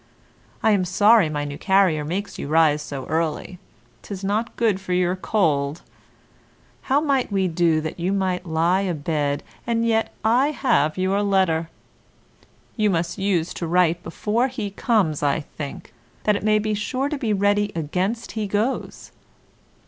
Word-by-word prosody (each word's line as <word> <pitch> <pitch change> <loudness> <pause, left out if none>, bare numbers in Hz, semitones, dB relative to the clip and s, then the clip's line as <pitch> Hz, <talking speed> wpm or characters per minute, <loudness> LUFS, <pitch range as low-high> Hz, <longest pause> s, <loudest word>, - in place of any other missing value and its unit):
I 220 - +4
am 200 -3 +3
sorry 205 0 +4
my 145 -1 -2
new 145 0 -6
carrier 190 -6 +3
makes 185 +7 -4
you - - -4
rise 155 -1 +3
so 140 -3 -6
early, 165 +2 -2 0.4
'tis 195 -1 -8
not 215 +4 -1
good 215 -5 +1
for 185 -1 -3
your 180 0 +1
cold; 155 -7 0 1.1
how 270 +2 +4
might 275 -6 0
we 190 -2 +1
do 165 -2 +2
that 160 +2 -6
you 180 +3 0
might 185 -2 -1
lie 170 +4 +2
a 185 -4 -1
bed 145 -1 -1 0.2
and 230 -1 +1
yet 225 -1 +1
I 245 +5 +4
have 155 - +1
your 190 +2 +1
letter? 185 -5 +1 1.1
You 215 -2 +2
must 170 -1 -1
use 185 -4 0
to 170 - -4
write 175 0 +2
before 220 +8 -1
he 230 -6 -5
comes, 195 - +1
I 145 +2 +1
think, 145 -4 -8 0.3
that 210 - +3
it - - -2
may 215 0 +3
be 215 0 -1
sure 255 +6 -2
to 300 0 -3
be 230 -5 -1
ready 205 +1 +2
against 185 +9 -2
he 215 -2 -3
goes. 210 +6 -2
190 Hz, 165 wpm, -23 LUFS, 160-215 Hz, 1.1 s, I